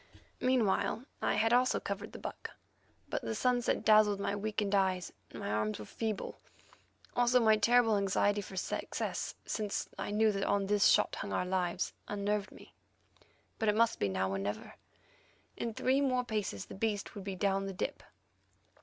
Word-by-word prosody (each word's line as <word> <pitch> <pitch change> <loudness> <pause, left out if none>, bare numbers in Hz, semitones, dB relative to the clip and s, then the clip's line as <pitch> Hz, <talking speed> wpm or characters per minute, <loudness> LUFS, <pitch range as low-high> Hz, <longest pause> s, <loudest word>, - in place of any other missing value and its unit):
Meanwhile 250 -1 +1 0.2
I - - +1
had 225 +2 +3
also 250 +1 +3
covered 200 +2 -5
the - - -8
buck, - - -6 0.6
but - - -2
the 225 - -3
sunset 245 +1 +1
dazzled 215 -2 +5
my 200 0 -1
weakened 205 0 -2
eyes, 190 -2 +1 0.2
and - - -9
my 100 - -3
arms 105 0 0
were 105 - -8
feeble; 215 - -4 0.8
also 245 +1 +4
my 220 -2 +5
terrible 225 +1 +4
anxiety 200 +1 +2
for 195 - -10
success, - - -3
since 210 -2 -2
I - - -3
knew 215 +1 +3
that 195 -1 -2
on 200 -1 +1
this 205 0 +4
shot - - +4
hung 200 - -5
our - - 0
lives, 180 -1 -1
unnerved 205 0 -1
me. - - -15 0.9
But 220 - +2
it 210 - +2
must 230 +1 +3
be 100 - +1
now 95 0 -1
or 95 - -1
never; 100 +2 -4 0.8
in 230 - -3
three 260 +5 +1
more 255 -2 +2
paces 210 - -3
the - - -10
beast 205 0 -2
would 200 - -7
be 195 -1 -4
down 195 0 0
the - - -3
dip. 185 - -3
205 Hz, 175 wpm, -32 LUFS, 195-225 Hz, 0.9 s, dazzled